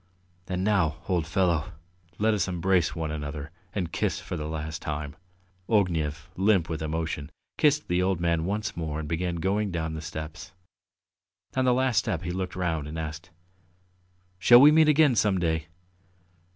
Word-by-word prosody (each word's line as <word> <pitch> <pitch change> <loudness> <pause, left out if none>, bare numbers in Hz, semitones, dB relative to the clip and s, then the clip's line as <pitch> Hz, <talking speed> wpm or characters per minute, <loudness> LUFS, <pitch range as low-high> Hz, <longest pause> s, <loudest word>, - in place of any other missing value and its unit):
And 90 0 -2
now, 95 -7 +2
old 90 -5 0
fellow, 85 -2 +1 0.4
let 110 +1 +2
us 105 - 0
embrace 90 -1 +1
one 80 -2 -3
another 75 0 -5 0.2
and 95 -4 -3
kiss - - -1
for - - -6
the 75 0 -4
last 80 0 -5
time!" 75 0 -4 0.5
Ognev, 80 -7 +1
limp 95 -3 +2
with 80 -2 -3
emotion, 80 -1 -3 0.3
kissed 150 0 +3
the 90 +1 +1
old 95 -1 +1
man 85 -1 +1
once 105 +2 -2
more 80 -2 -3
and 75 - -5
began 85 +2 -1
going 100 +5 0
down 80 -3 -3
the 80 - -5
steps. 80 +4 -7 1.0
On 130 0 +2
the 125 - +4
last 130 -3 +1
step 85 -1 0
he 85 - -3
looked 95 0 -4
round 85 -5 -1
and 80 +2 -6
asked: 80 +3 -6 1.1
"Shall 120 +6 +8
we 145 +3 +9
meet 155 0 +5
again 150 -2 +5
some 105 -4 +2
day?" 80 -2 -1
85 Hz, 165 wpm, -27 LUFS, 80-95 Hz, 1.1 s, we